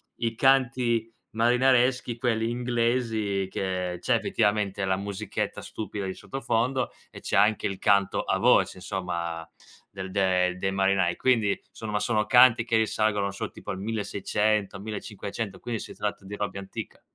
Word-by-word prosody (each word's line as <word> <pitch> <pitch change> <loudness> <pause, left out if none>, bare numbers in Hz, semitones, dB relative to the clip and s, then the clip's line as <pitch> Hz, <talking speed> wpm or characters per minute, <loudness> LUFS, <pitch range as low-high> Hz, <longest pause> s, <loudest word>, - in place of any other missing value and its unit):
i 115 -1 -2
canti 125 -3 +2 0.2
marinareschi, 125 +1 +3
quelli 115 -2 0
inglesi, 115 -5 0
che 90 -2 -2
c'è 125 - +2
effettivamente 105 -3 0
la 95 0 +1
musichetta 100 +1 -4
stupida 105 -2 -5
di 95 - -3
sottofondo 130 -1 -1 0.2
e - - -11
c'è - - 0
anche 105 0 +3
il 95 -1 -4
canto 100 -1 +2
a - - 0
voce, - - +4
insomma, 85 -3 -4 0.4
del 95 -1 -7
de 90 -2 +2
dei 95 +1 -1
marinai. 95 -2 +2
Quindi, 115 -6 +2
somma 105 -2 -3
sono 110 -3 +1
canti 125 -2 +6
che 115 - 0
risalgono, 110 -2 +1
non 100 - -1
so, 100 - -5
tipo - - -7
al 95 - -5
1600, 105 -1 -1
1500, 105 -1 -5
quindi 115 -3 -3
si - - -8
tratta 105 -1 -4
di 100 +1 -6
robe 100 -1 -3
antica. 95 - -8
105 Hz, 150 wpm, -27 LUFS, 95-115 Hz, 0.4 s, canti